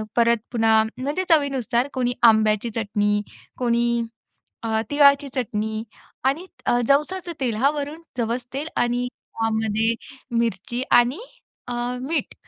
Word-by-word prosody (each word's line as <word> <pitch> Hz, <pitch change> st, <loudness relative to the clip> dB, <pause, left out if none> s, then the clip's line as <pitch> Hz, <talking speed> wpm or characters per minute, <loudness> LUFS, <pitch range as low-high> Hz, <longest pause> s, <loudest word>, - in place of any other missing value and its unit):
परत 235 Hz, 0 st, +4 dB
पुन्हा 225 Hz, -2 st, +4 dB
म्हणजे 290 Hz, +8 st, -1 dB
चवीनुसार 270 Hz, -5 st, +2 dB
कोणी 245 Hz, -2 st, 0 dB, 0.2 s
आंब्याची 215 Hz, +1 st, +1 dB
चटणी 205 Hz, -1 st, +1 dB, 0.4 s
कोणी 235 Hz, -1 st, +1 dB, 0.6 s
अ, 220 Hz, -1 st, 0 dB
तिळाची 280 Hz, -1 st, +5 dB
चटणी 220 Hz, -3 st, -2 dB, 0.4 s
आणि 285 Hz, +7 st, +1 dB, 0.2 s
अ, 240 Hz, -, +3 dB
जवसाचं 345 Hz, +6 st, +1 dB
तेल 235 Hz, -4 st, 0 dB
हां 275 Hz, +6 st, +3 dB
वरून, 295 Hz, +2 st, -5 dB, 0.2 s
जवस 240 Hz, +1 st, -1 dB
तेल 290 Hz, +3 st, -3 dB
आणि 245 Hz, +1 st, +1 dB
त्यामध्ये 225 Hz, -1 st, -1 dB, 0.5 s
मिरची 235 Hz, +2 st, -1 dB
आणि 245 Hz, -, +4 dB, 0.5 s
अ, 245 Hz, -, -3 dB, 0.3 s
मीठ 310 Hz, +6 st, -2 dB
240 Hz, 120 wpm, -23 LUFS, 225-275 Hz, 0.6 s, तिळाची